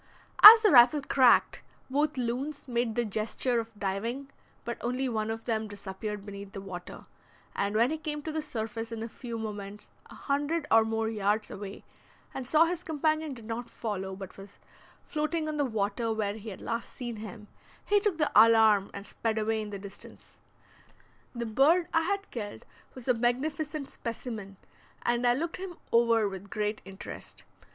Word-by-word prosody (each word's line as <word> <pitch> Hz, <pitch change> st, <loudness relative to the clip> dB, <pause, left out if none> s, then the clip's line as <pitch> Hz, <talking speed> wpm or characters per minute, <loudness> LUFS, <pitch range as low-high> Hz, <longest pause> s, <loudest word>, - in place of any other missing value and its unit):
As 445 Hz, +2 st, +13 dB
the 420 Hz, -, +5 dB
rifle 255 Hz, +4 st, +7 dB
cracked 260 Hz, -3 st, +4 dB, 0.3 s
both 290 Hz, +2 st, 0 dB
loons 255 Hz, +5 st, -3 dB
made 235 Hz, -2 st, -1 dB
the 240 Hz, -, +1 dB
gesture 225 Hz, +3 st, 0 dB
of 225 Hz, 0 st, -5 dB
diving, 230 Hz, +8 st, -3 dB, 0.3 s
but 235 Hz, -, -4 dB
only 250 Hz, +2 st, -1 dB
one 220 Hz, -3 st, -2 dB
of 225 Hz, 0 st, -5 dB
them 220 Hz, -2 st, -1 dB
disappeared 205 Hz, 0 st, -6 dB
beneath 200 Hz, -1 st, -9 dB
the -, -, -5 dB
water; 185 Hz, -2 st, -9 dB, 0.5 s
and 200 Hz, +1 st, -1 dB
when 235 Hz, +5 st, +3 dB
he 315 Hz, -, -3 dB
came 300 Hz, -2 st, -4 dB
to 315 Hz, -, -4 dB
the 315 Hz, 0 st, -2 dB
surface 225 Hz, -5 st, -5 dB
in 225 Hz, -1 st, -4 dB
a -, -, -4 dB
few 235 Hz, 0 st, -7 dB
moments, 210 Hz, -2 st, -7 dB, 0.2 s
a -, -, -13 dB
hundred 290 Hz, +3 st, -1 dB
or 225 Hz, 0 st, +7 dB
more 225 Hz, 0 st, -1 dB
yards 215 Hz, 0 st, 0 dB
away, 200 Hz, 0 st, -8 dB, 0.5 s
and 265 Hz, -2 st, -5 dB
saw 315 Hz, +4 st, +5 dB
his 350 Hz, +1 st, -3 dB
companion 310 Hz, -2 st, -1 dB
did 230 Hz, -3 st, -12 dB
not 230 Hz, +2 st, -5 dB
follow, 190 Hz, -4 st, -4 dB
but 190 Hz, 0 st, -10 dB
was 195 Hz, +1 st, -13 dB, 0.5 s
floating 310 Hz, +1 st, -2 dB
on 305 Hz, -1 st, -3 dB
the 290 Hz, -, +2 dB
water 220 Hz, 0 st, -1 dB
where 215 Hz, -2 st, -1 dB
he 220 Hz, +1 st, -8 dB
had 190 Hz, -, -9 dB
last 230 Hz, 0 st, -4 dB
seen 240 Hz, -3 st, -6 dB
him, 215 Hz, 0 st, -9 dB, 0.4 s
he 410 Hz, -, +4 dB
took 400 Hz, -4 st, 0 dB
the 305 Hz, -2 st, +1 dB
alarm 220 Hz, -2 st, +6 dB
and 200 Hz, 0 st, -7 dB
sped 225 Hz, 0 st, -2 dB
away 220 Hz, 0 st, 0 dB
in 210 Hz, -, -6 dB
the 200 Hz, -, -5 dB
distance. 195 Hz, 0 st, -11 dB, 1.0 s
The 235 Hz, 0 st, -3 dB
bird 285 Hz, +10 st, +3 dB
I 330 Hz, -, +4 dB
had 395 Hz, +4 st, -2 dB
killed 210 Hz, -4 st, -6 dB, 0.3 s
was 255 Hz, -1 st, -11 dB
a 250 Hz, -, +5 dB
magnificent 285 Hz, +5 st, -1 dB
specimen, 220 Hz, -4 st, -7 dB, 0.5 s
and 240 Hz, +1 st, +1 dB
I 240 Hz, -, +4 dB
looked 330 Hz, +5 st, -3 dB
him 370 Hz, -2 st, -7 dB
over 230 Hz, -2 st, +4 dB
with 195 Hz, 0 st, -8 dB
great 210 Hz, +1 st, -2 dB
interest. 195 Hz, 0 st, -9 dB
230 Hz, 180 wpm, -29 LUFS, 210-280 Hz, 1.0 s, As